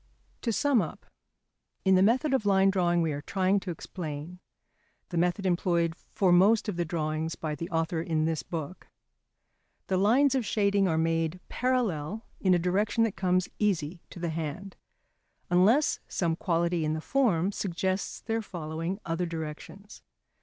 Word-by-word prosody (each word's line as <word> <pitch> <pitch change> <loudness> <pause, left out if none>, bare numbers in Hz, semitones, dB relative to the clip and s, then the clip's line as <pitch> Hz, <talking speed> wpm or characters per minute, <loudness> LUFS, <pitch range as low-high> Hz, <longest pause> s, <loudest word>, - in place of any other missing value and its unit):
] - - -38
To 235 - 0
sum 270 0 +3
up, 160 - -6 0.8
in 190 - +5
the 185 - +5
method 255 +8 +3
of 265 - +2
line 195 -1 +4
drawing 175 -3 +2
we 160 - 0
are 145 0 -4
trying 190 +4 +1
to 190 - -7
explain 165 0 -6 0.7
(the 175 - -3
method 180 +3 0
employed 170 -2 +1
for 185 +1 0
most 200 +6 +5
of 205 - -2
the 175 0 -1
drawings 160 0 -2
by 155 -2 -4
the 165 +3 -5
author 165 -1 -1
in 160 -2 0
this 160 -1 -1
book) 165 +1 -6 1.0
the 190 - 0
lines 250 +8 +4
of 260 -2 +1
shading 200 -2 +2
are 160 -2 +1
made 165 +1 0
parallel 220 -7 -1
in 185 -2 +3
a - - +4
direction 200 +6 +1
that 225 - +1
comes 185 -1 +1
easy 175 -5 0
to - - -12
the 170 -1 -2
hand, 165 +5 -5 0.8
unless 210 +12 +4
some 165 -3 0
quality 170 -1 0
in 155 0 0
the 155 - -2
form 200 -4 +1
suggests 190 0 -2
their 225 0 -2
following 165 0 -4
other 170 +1 -1
directions. 165 +5 -7
180 Hz, 165 wpm, -28 LUFS, 165-200 Hz, 1.0 s, in